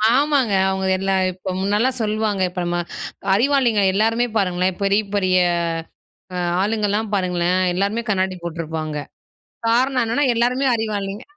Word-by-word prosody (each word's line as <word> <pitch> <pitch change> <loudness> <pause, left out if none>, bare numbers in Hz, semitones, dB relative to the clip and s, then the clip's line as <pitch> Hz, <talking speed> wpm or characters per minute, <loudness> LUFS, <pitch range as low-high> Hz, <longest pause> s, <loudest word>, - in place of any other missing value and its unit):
ஆமாங்க. 275 -5 +2 0.2
அவங்க 190 0 -2
எல்லாம் 190 -1 +1
இப்போ 185 +1 -6
முன்னலாம் 210 +7 +1
சொல்லுவாங்க. 215 -2 -1
இப்ப 180 0 -4
நம்ம 175 0 -1 0.5
அறிவாளிங்க 240 -1 +3
எல்லாருமே 225 +4 +2
பாருங்களேன். 185 -1 0
பெரிய, 200 +1 +3
பெரிய 185 -2 +2 1.0
அ - - -2 0.2
ஆளுங்கலாம் 210 0 0
பாருங்களேன் 180 -1 +1
எல்லாருமே 200 +5 0
கண்ணாடி 190 -2 0
போட்ருப்பாங்க. 160 -2 -4 0.7
காரணம் 255 +2 +2
என்னன்னா 235 +6 +1
எல்லாருமே 250 +4 +1
அறிவாளிங்க. 210 -1 -3
205 Hz, 120 wpm, -21 LUFS, 185-230 Hz, 1.0 s, அறிவாளிங்க